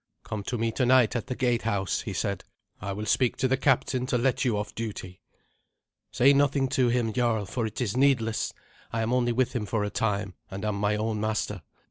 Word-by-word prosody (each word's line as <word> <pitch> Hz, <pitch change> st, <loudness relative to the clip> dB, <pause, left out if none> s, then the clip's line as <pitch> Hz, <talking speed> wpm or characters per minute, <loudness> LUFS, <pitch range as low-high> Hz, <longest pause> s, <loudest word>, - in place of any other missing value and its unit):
"Come 105 Hz, -, -4 dB
to 125 Hz, -, -2 dB
me 115 Hz, 0 st, 0 dB
tonight 125 Hz, -1 st, +3 dB
at 120 Hz, -, -2 dB
the 130 Hz, -, -3 dB
gatehouse," 115 Hz, -, 0 dB
he -, -, -5 dB
said. 100 Hz, -2 st, -2 dB, 0.4 s
"I 100 Hz, +1 st, -3 dB
will 105 Hz, +2 st, -4 dB
speak 125 Hz, +3 st, +2 dB
to 130 Hz, -, +1 dB
the 130 Hz, -, +2 dB
captain 130 Hz, -1 st, +1 dB
to 125 Hz, -, +1 dB
let 125 Hz, +1 st, +1 dB
you 120 Hz, -5 st, +1 dB
off 105 Hz, -, -4 dB
duty." 100 Hz, -5 st, -6 dB, 0.9 s
"Say 135 Hz, +3 st, +5 dB
nothing 140 Hz, -1 st, +2 dB
to 125 Hz, -1 st, +2 dB
him, 120 Hz, -2 st, +1 dB
jarl, 115 Hz, -4 st, +1 dB
for 115 Hz, +3 st, -2 dB
it 110 Hz, -, -7 dB
is 120 Hz, -4 st, -1 dB
needless. 125 Hz, -5 st, +2 dB, 0.4 s
I 115 Hz, -1 st, -1 dB
am 115 Hz, +2 st, 0 dB
only 120 Hz, -1 st, +2 dB
with 125 Hz, +2 st, +1 dB
him 105 Hz, -4 st, -2 dB
for 110 Hz, -1 st, 0 dB
a 105 Hz, -, -2 dB
time, 100 Hz, -3 st, -1 dB, 0.2 s
and 100 Hz, +2 st, -5 dB
am 105 Hz, -1 st, -1 dB
my 105 Hz, +1 st, +1 dB
own 110 Hz, 0 st, -1 dB
master. 110 Hz, 0 st, -2 dB
115 Hz, 210 wpm, -27 LUFS, 105-125 Hz, 0.9 s, Say